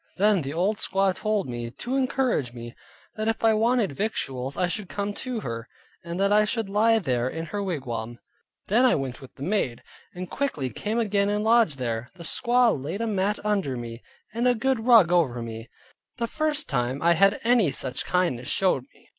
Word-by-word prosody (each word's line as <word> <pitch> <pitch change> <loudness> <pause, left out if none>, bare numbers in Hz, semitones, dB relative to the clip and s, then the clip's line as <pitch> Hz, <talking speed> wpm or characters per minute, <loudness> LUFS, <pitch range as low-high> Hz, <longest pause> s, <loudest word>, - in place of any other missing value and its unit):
Then 205 -1 +3
the 135 -1 -4
old 185 +7 0
squaw 195 -1 +1
told 215 -4 -1
me, 120 -1 -4
to 245 - -4
encourage 260 - 0
me, 120 -1 -8 0.4
that 215 0 -3
if 225 - -1
I 225 -1 +5
wanted 225 - +2
victuals, 135 - -3
I 180 - +2
should 190 +2 -4
come 205 0 -3
to 245 0 -4
her, 115 -1 -5 0.3
and 170 +1 -5
that 200 +1 +3
I 210 0 +5
should 215 -1 -1
lie 225 +3 +4
there 125 - 0
in 165 +4 -5
her 205 +5 -4
wigwam. 120 - -4 0.5
Then 230 +6 +3
I 255 - +5
went 135 -1 -4
with 135 - -13
the 140 - -8
maid, 160 - -1 0.3
and 180 +1 -5
quickly 155 - -2
came 210 - -3
again 205 -3 +1
and 210 0 0
lodged 225 -9 +4
there. 120 -1 -3
The 175 - -10
squaw 240 +7 +3
laid 170 +9 -4
a - - 0
mat 205 -1 0
under 195 -12 0
me, 115 0 -7 0.3
and 235 +2 +1
a 245 - +4
good 245 0 -1
rug 220 -8 +7
over 150 -9 +2
me; 115 0 -7 0.5
the 235 - -1
first 305 +4 0
time 125 0 -1
I 170 0 +5
had 195 +4 +3
any 230 -7 +4
such 130 -1 -2
kindness 170 -10 0
showed 180 -9 +1
me. - - -24
195 Hz, 200 wpm, -25 LUFS, 135-225 Hz, 0.5 s, rug